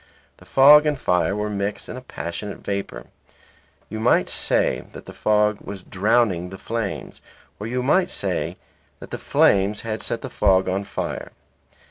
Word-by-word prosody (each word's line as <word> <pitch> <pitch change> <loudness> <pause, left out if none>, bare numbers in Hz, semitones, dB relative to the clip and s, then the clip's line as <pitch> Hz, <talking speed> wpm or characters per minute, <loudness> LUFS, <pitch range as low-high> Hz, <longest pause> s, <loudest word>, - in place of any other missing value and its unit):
The - - -18
fog 150 +3 +7
and 145 -3 0
fire 90 -2 +1
were 105 0 -2
mixed 100 0 -3
in - - -7
a 130 - -7
passionate 100 -3 -6
vapour; 100 0 -4 0.8
you 110 - -6
might 115 +3 +3
say - - +1
that - - -10
the - - -10
fog 105 -1 +2
was 95 -2 -8
drowning 100 -3 +1
the 95 - -9
flames; 115 -2 -5 0.4
or 105 - -5
you 125 +2 -2
might 180 +7 +3
say 95 - -2 0.4
that - - -11
the - - -5
flames 100 +1 +2
had 110 -1 -4
set 115 - -1
the 130 - -5
fog 95 -2 +3
on 95 +2 -1
fire. - - -5
105 Hz, 165 wpm, -22 LUFS, 95-120 Hz, 0.8 s, fog